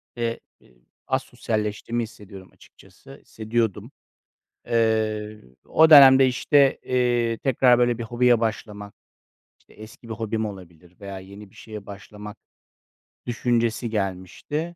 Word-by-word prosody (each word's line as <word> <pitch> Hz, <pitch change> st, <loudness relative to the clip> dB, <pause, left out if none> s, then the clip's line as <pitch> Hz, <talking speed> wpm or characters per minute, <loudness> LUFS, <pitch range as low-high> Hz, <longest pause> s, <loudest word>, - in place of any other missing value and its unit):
eee, 115 Hz, -1 st, -3 dB, 0.2 s
e -, -, -25 dB, 0.4 s
asosyalleştiğimi 110 Hz, +2 st, -3 dB
hissediyorum 100 Hz, -4 st, -12 dB
açıkçası. -, -, -18 dB
Hissediyordum. 110 Hz, -1 st, -3 dB, 0.8 s
Eee, 110 Hz, -2 st, -1 dB, 0.2 s
o 160 Hz, 0 st, +4 dB
dönemde, 135 Hz, -3 st, +8 dB
işte, 135 Hz, +2 st, +2 dB
eee, 120 Hz, -2 st, 0 dB
tekrar 125 Hz, -1 st, +3 dB
böyle 120 Hz, -1 st, +1 dB
bir 120 Hz, -, -5 dB
hobiye 120 Hz, +1 st, +2 dB
başlamak, 105 Hz, -2 st, -5 dB, 0.7 s
işte, -, -, -24 dB
eski 110 Hz, +2 st, -14 dB
bir 110 Hz, -, -5 dB
hobim 110 Hz, 0 st, -3 dB
olabilir 90 Hz, -3 st, -12 dB
veya 100 Hz, -1 st, -8 dB
yeni 100 Hz, +2 st, -13 dB
bir -, -, -25 dB
şeye 105 Hz, -2 st, -10 dB
başlamak 105 Hz, +1 st, -11 dB, 0.9 s
düşüncesi 120 Hz, -1 st, -1 dB
gelmişti. 105 Hz, -, -4 dB
110 Hz, 115 wpm, -23 LUFS, 105-120 Hz, 0.9 s, dönemde